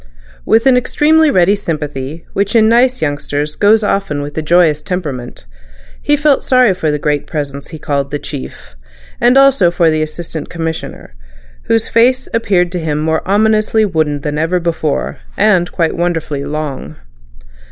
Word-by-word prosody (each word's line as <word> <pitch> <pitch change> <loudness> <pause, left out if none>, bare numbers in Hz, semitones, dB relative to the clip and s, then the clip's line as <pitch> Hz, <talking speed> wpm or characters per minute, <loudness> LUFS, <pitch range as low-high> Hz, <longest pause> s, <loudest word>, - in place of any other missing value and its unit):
With 225 +2 +3
an 260 -2 +5
extremely 310 +5 +3
ready 190 -4 +3
sympathy, 150 -4 -5
which 200 +3 -1
in 220 -1 +5
nice 245 -1 +2
youngsters 145 0 -3
goes 215 +2 +3
often 195 -8 -1
with 145 0 -8
a 160 - -2
joyous 155 -1 +2
temperament, 150 - -5 0.6
he 295 - +1
felt 290 -1 +2
sorry 255 -5 +3
for 160 -4 -2
the 150 - 0
great 145 0 -2
Presence 140 -3 -5
he 160 - -9
called 140 -2 -2
"The 145 - -3
Chief," 65 - -9 0.5
and 245 +3 +4
also 275 -10 +5
for 170 -1 +2
the 155 0 0
Assistant 155 0 -5
Commissioner, 160 - -6 0.5
whose 225 -1 +1
face 255 +3 +2
appeared 190 -6 +1
to 180 - -3
him 155 -3 -2
more 160 +1 0
ominously 215 +2 +2
wooden 155 -6 -1
than 150 +1 -3
ever 170 +3 0
before, 160 -3 -2 0.2
and 185 -4 +2
quite 165 -3 -1
wonderfully 165 -5 -2
long. 145 - -5
170 Hz, 160 wpm, -14 LUFS, 150-215 Hz, 0.6 s, an